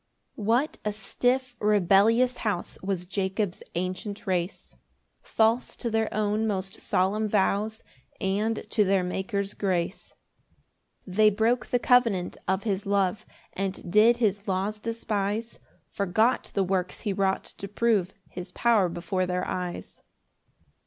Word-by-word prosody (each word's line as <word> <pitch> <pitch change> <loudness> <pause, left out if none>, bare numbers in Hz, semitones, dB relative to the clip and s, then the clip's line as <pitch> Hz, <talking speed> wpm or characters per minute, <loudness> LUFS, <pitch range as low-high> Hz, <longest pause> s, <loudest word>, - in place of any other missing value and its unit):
1 210 - -7
What 250 +7 +2
a 210 - 0
stiff 245 +5 0
rebellious 210 +5 +4
house 205 -6 -2
Was 185 -2 -2
Jacob's 190 0 -2
ancient 185 +4 -4
race! 180 -1 -2 0.5
False 225 +2 +1
to 235 - -4
their 220 0 +1
own 215 +1 0
most 195 -2 -3
solemn 200 +4 +1
vows, 210 +2 0 0.4
And 210 +4 -1
to 215 - +4
their 195 -1 +2
Maker's 195 +2 -2
grace. 185 -1 -2 0.9
2 190 - -10
They 215 +3 +5
broke 225 +4 +1
the 245 - +2
covenant 235 -7 +3
of 190 +1 0
his 200 -2 -2
love, 200 0 +1 0.3
And 190 -2 -4
did 220 +4 +6
his 205 -3 0
laws 195 +3 -1
despise, 220 0 -2 0.3
Forgot 215 +5 +1
the 195 - +3
works 185 -1 -1
he 205 -3 -1
wrought 190 0 +1 0.2
to 200 - -5
prove 205 -3 +1
His 180 0 -8
power 220 -6 +3
before 180 +2 -2
their 180 0 -1
eyes. 180 -1 -5
200 Hz, 135 wpm, -27 LUFS, 190-220 Hz, 0.9 s, did